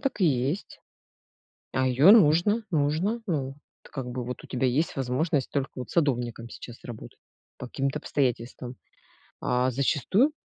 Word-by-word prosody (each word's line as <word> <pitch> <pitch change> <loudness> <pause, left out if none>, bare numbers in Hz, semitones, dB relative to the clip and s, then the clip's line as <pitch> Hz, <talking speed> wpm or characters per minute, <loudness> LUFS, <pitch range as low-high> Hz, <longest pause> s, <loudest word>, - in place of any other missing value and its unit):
так 275 -6 -2
и - - +5
есть. 140 +7 -1 0.9
А 130 0 +1
ее 135 +9 +6
нужно, 205 +3 +5
нужно. 165 +9 0
Ну, 145 -7 0
вот, 135 - -10 0.4
как 130 -3 -5
бы, 125 0 -4
вот, 125 +1 -6
у - - -9
тебя 130 +1 0
есть 140 +6 0
возможность 135 +2 0
только 140 -1 -1
вот 125 - -6
садовником 120 -7 0
сейчас 120 +1 -10
работать, 120 -3 -9 0.4
по 125 - -6
каким-то 135 +3 -2
обстоятельствам. 125 -2 -2 0.6
А, 125 +1 +1
зачастую 150 - +2
135 Hz, 150 wpm, -27 LUFS, 125-160 Hz, 0.9 s, ее